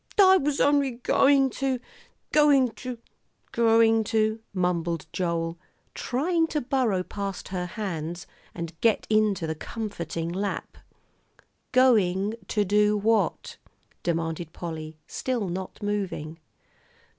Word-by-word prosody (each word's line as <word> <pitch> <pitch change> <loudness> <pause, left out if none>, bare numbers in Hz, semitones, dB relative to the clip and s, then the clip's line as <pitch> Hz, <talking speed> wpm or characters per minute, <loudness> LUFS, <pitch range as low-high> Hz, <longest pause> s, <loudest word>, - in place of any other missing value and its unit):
"I 380 -1 +8
was 290 -3 -1
only 285 -2 +3
going 270 +2 +3
to 265 -2 +1 0.5
going 285 -4 +5
to 250 +1 -7 0.5
going 225 -1 +4
to 220 0 +1
" - - -47
mumbled 175 -3 -1
Joel, 170 -1 -2 0.3
trying 325 +6 0
to 310 - -1
burrow 240 -8 0
past 200 0 -5
her 180 -2 -3
hands, 175 -4 -5 0.3
and 170 -1 -5
get 225 -2 +2
into 215 -5 +2
the 160 - -2
comforting 170 -3 -5
lap. 195 +3 -4 0.9
"Going 210 -6 +3
to 210 -2 +1
do 210 +2 +3
what?" 215 0 0 0.4
demanded 165 -1 -2
Polly, 160 -2 -6
still 245 -6 -2
not 185 +3 -6
moving. 190 -6 -3
205 Hz, 115 wpm, -26 LUFS, 175-250 Hz, 0.9 s, I